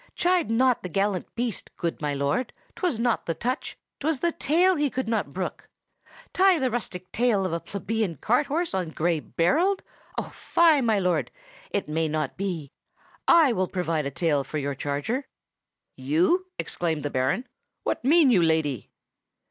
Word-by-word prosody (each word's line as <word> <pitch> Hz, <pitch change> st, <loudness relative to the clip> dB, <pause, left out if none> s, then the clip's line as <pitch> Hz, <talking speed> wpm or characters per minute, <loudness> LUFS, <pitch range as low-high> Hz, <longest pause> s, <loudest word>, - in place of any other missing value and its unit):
"Chide 355 Hz, -4 st, +2 dB
not 250 Hz, +2 st, +3 dB
the 180 Hz, -, -5 dB
gallant 195 Hz, +1 st, 0 dB
beast, 240 Hz, -3 st, -3 dB
good 170 Hz, -2 st, -3 dB
my 150 Hz, -1 st, -1 dB
lord! 140 Hz, -, -1 dB, 0.2 s
'twas 355 Hz, -, 0 dB
not 235 Hz, 0 st, 0 dB
the 165 Hz, -, -1 dB
touch, 255 Hz, +4 st, -3 dB, 0.2 s
'twas 305 Hz, -1 st, 0 dB
the 340 Hz, +5 st, +1 dB
tail, 350 Hz, +5 st, +3 dB
he 295 Hz, -2 st, +1 dB
could 260 Hz, -1 st, -3 dB
not 220 Hz, -10 st, -1 dB
brook. 185 Hz, +4 st, -5 dB, 0.6 s
Tie 380 Hz, -1 st, +5 dB
the 260 Hz, -4 st, 0 dB
rustic 185 Hz, -6 st, -4 dB
tail 225 Hz, -5 st, +2 dB
of 180 Hz, -, -2 dB
a 170 Hz, -, 0 dB
plebeian 200 Hz, -1 st, -2 dB
cart 245 Hz, -, +1 dB
horse 330 Hz, +4 st, -1 dB
on 185 Hz, -3 st, -1 dB
Gray 165 Hz, +1 st, 0 dB
Berold? 330 Hz, -, +1 dB, 0.3 s
Oh! -, -, -3 dB
fie, 325 Hz, -4 st, +3 dB
my 225 Hz, -4 st, +2 dB
lord! 180 Hz, -5 st, +1 dB, 0.4 s
it 200 Hz, -, -2 dB
may 160 Hz, +1 st, 0 dB
not 155 Hz, 0 st, -2 dB
be. 175 Hz, -7 st, -4 dB, 0.6 s
I 320 Hz, -7 st, +6 dB
will 185 Hz, -3 st, 0 dB
provide 165 Hz, -6 st, -1 dB
a -, -, -1 dB
tail 145 Hz, -1 st, +1 dB
for 155 Hz, -, -5 dB
your 140 Hz, -1 st, -2 dB
charger!" 145 Hz, -, -3 dB, 0.7 s
"You!" 170 Hz, -, +1 dB
exclaimed 160 Hz, -4 st, -2 dB
the 145 Hz, -, -2 dB
Baron. 130 Hz, -, 0 dB, 0.4 s
"What -, -, -2 dB
mean 295 Hz, 0 st, +5 dB
you, 190 Hz, -7 st, +5 dB
lady?" 160 Hz, -7 st, +1 dB
200 Hz, 170 wpm, -26 LUFS, 160-265 Hz, 0.7 s, I